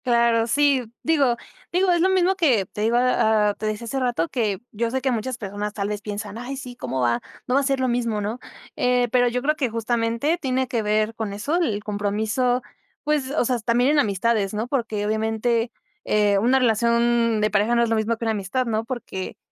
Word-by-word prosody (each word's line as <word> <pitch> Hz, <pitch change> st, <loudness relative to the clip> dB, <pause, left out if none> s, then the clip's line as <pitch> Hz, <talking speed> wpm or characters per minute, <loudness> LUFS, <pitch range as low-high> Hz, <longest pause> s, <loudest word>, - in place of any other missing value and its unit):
Claro, 235 Hz, -2 st, +3 dB
sí, 270 Hz, -3 st, +2 dB
digo 280 Hz, -7 st, +2 dB, 0.3 s
digo, 365 Hz, +1 st, +2 dB
es 345 Hz, -1 st, +2 dB
lo 375 Hz, -, +4 dB
mismo 380 Hz, 0 st, +3 dB
que 265 Hz, -, +2 dB
te 210 Hz, +3 st, -4 dB
iba 225 Hz, -3 st, +3 dB
a -, -, -1 dB
Te 215 Hz, -, -5 dB
decía 215 Hz, +2 st, -3 dB
hace 270 Hz, +4 st, -2 dB
rato 240 Hz, -10 st, 0 dB
que 215 Hz, -7 st, -1 dB
yo 230 Hz, +1 st, -1 dB
sé 260 Hz, +3 st, -1 dB
que 260 Hz, 0 st, 0 dB
muchas 240 Hz, +1 st, -2 dB
personas 205 Hz, -1 st, -5 dB
tal 205 Hz, -1 st, -3 dB
vez 210 Hz, 0 st, -3 dB
piensan, 205 Hz, +1 st, -6 dB
ay, 260 Hz, +3 st, -5 dB
sí, 250 Hz, -2 st, -8 dB
¿cómo 130 Hz, -, -3 dB
va? 120 Hz, -1 st, +1 dB, 0.2 s
No 250 Hz, -, -2 dB
va 275 Hz, -, +4 dB
a -, -, -3 dB
ser 275 Hz, -1 st, 0 dB
lo 260 Hz, -, +1 dB
mismo, 235 Hz, -3 st, 0 dB
¿no? 210 Hz, +4 st, -3 dB, 0.4 s
Eh, 250 Hz, -1 st, +2 dB
pero 245 Hz, 0 st, +4 dB
yo 245 Hz, +1 st, -1 dB
creo 305 Hz, +2 st, +2 dB
que 270 Hz, -5 st, -1 dB
justamente 230 Hz, +7 st, 0 dB
tiene 260 Hz, -1 st, 0 dB
que 235 Hz, -2 st, -1 dB
ver 215 Hz, +1 st, +1 dB
con 220 Hz, -3 st, -4 dB
eso, 245 Hz, +12 st, -1 dB
el 215 Hz, -, -1 dB
compromiso, 215 Hz, +5 st, 0 dB, 0.4 s
pues, 300 Hz, -3 st, 0 dB
o 280 Hz, -3 st, 0 dB
sea, 245 Hz, 0 st, 0 dB
también 240 Hz, +4 st, +2 dB
en 300 Hz, -, +3 dB
amistades, 210 Hz, -3 st, +1 dB
¿no? 220 Hz, +3 st, -2 dB
Porque 230 Hz, -6 st, -2 dB
obviamente, 225 Hz, +2 st, 0 dB, 0.3 s
eh, 205 Hz, -1 st, +2 dB
una 245 Hz, +6 st, +3 dB
relación 235 Hz, -1 st, +2 dB
de 215 Hz, 0 st, +1 dB
pareja 210 Hz, +3 st, +2 dB
no 235 Hz, -, +4 dB
es 235 Hz, -, 0 dB
lo 225 Hz, -, +2 dB
mismo 220 Hz, +1 st, 0 dB
que 230 Hz, -, -4 dB
una 225 Hz, -, +1 dB
amistad, 210 Hz, +5 st, -1 dB
¿no? 220 Hz, -1 st, -1 dB
Porque, 230 Hz, -7 st, -6 dB
235 Hz, 220 wpm, -23 LUFS, 215-255 Hz, 0.4 s, lo